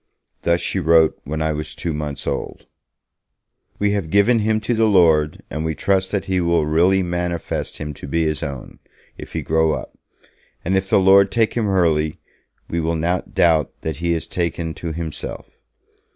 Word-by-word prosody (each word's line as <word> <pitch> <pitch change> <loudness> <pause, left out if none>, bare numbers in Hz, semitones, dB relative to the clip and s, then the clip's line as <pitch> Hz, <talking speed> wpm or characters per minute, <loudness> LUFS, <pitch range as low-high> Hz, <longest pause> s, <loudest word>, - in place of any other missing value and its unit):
Thus 85 0 +2
she 95 - -1
wrote 80 -2 +4
when 80 +2 -2
I 80 - 0
was 75 0 -5
two 85 - -3
months 75 -2 -4
old: - - -4 1.1
'We 105 0 +1
have 100 -6 -2
given 100 +6 +4
him 110 0 +1
to 115 +3 -1
the 110 -1 +3
Lord; 80 -7 +3
and 75 +2 -3
we 80 -1 -2
trust 95 +4 +1
that 100 -2 -2
He 95 -1 0
will 85 -2 +2
really 90 +5 +3
manifest 85 -1 -3
him 75 -1 -5
to 70 - -10
be 80 +4 0
His 75 -1 -1
own, 70 -5 -7 0.4
if - - -10
he - - -3
grow 80 0 +2
up; - - -6 0.7
and 95 +3 +1
if 95 0 0
the - - +4
Lord 95 +1 +5
take 110 +1 +1
him 110 -4 0
early, 80 -5 +1 0.5
we 85 - -2
will 80 +1 0
not 85 +3 -2
doubt 80 -4 +3
that 80 -3 -4
he 85 +1 0
is 80 - -4
taken 85 -2 -2
to 85 0 -5
Himself. 80 -1 -6
85 Hz, 185 wpm, -20 LUFS, 80-95 Hz, 1.1 s, Lord